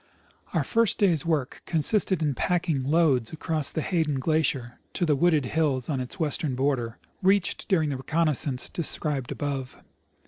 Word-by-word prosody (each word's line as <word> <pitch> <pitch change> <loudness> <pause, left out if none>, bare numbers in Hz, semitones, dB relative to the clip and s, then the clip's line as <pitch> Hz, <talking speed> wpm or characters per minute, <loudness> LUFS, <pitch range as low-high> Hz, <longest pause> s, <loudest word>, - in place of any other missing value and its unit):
Our - - +2
first 230 -2 +3
day's 170 -6 +2
work 150 -6 -1
consisted 175 +1 +1
in 145 -2 +1
packing 165 -1 0
loads 140 -5 +2
across 160 -2 -2
the 160 - -2
Hayden 160 -6 0
glacier 135 -4 0
to 175 - 0
the 150 -3 +2
wooded 155 -2 +2
hills 140 -3 0
on 140 -4 -1
its 125 -1 -5
Avestern 155 -4 -1
border, 125 -4 -1 0.2
reached 195 0 +1
during 160 -7 +2
the 135 - -2
reconnoissance 150 -2 0
de - - -4
scribed 145 -4 -1
above. 135 -3 -4
150 Hz, 160 wpm, -26 LUFS, 135-165 Hz, 0.2 s, first